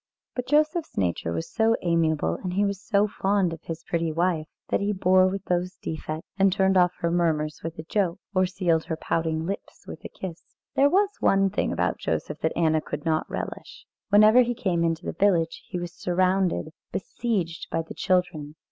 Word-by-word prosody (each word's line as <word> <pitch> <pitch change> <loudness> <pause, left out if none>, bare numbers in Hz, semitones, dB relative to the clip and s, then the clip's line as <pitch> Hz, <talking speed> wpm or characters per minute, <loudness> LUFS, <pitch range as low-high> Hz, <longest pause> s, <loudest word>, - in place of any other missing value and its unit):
But 250 -1 -4
Joseph's 305 +2 +1
nature 85 -3 0
was 80 -1 -3
so 225 0 +3
amiable, 160 - +1
and 180 -1 -3
he 200 +2 +2
was 200 -1 -2
so 205 -1 +2
fond 195 -3 +1
of 165 - -9
his 165 0 -6
pretty 165 -1 -1
wife, 165 -1 0 0.2
that - - +2
he 205 +1 0
bore 185 -1 +4
with 195 0 -3
those 180 +1 -1
defects, 155 -1 -5
and 195 0 +5
turned 190 0 +2
off 180 -1 +4
her 170 - +1
murmurs 155 -3 0
with 165 0 -5
a 155 - -6
joke, 185 0 0 0.2
or 185 -1 +3
sealed 175 -3 0
her 165 -1 -2
pouting 160 0 -1
lips 195 +3 -6
with - - -9
a - - -7
kiss. 175 -3 -8 0.3
There 280 +1 +5
was 395 +5 +3
one 195 0 +3
thing - - 0
about - - 0
Joseph 150 - -3
that 160 - -1
Anna 160 -2 +3
could 150 0 -6
not 160 -1 0
relish. - - -6 0.2
Whenever 215 +4 +7
he 245 0 0
came 185 -8 0
into 165 -1 -1
the - - -2
village, 170 -3 +1
he - - -4
was 175 -1 -5
surrounded, 185 -1 +1 0.2
besieged 185 -5 -2
by 165 - -1
the 160 - -9
children. 180 -5 0
180 Hz, 195 wpm, -26 LUFS, 165-195 Hz, 0.3 s, Whenever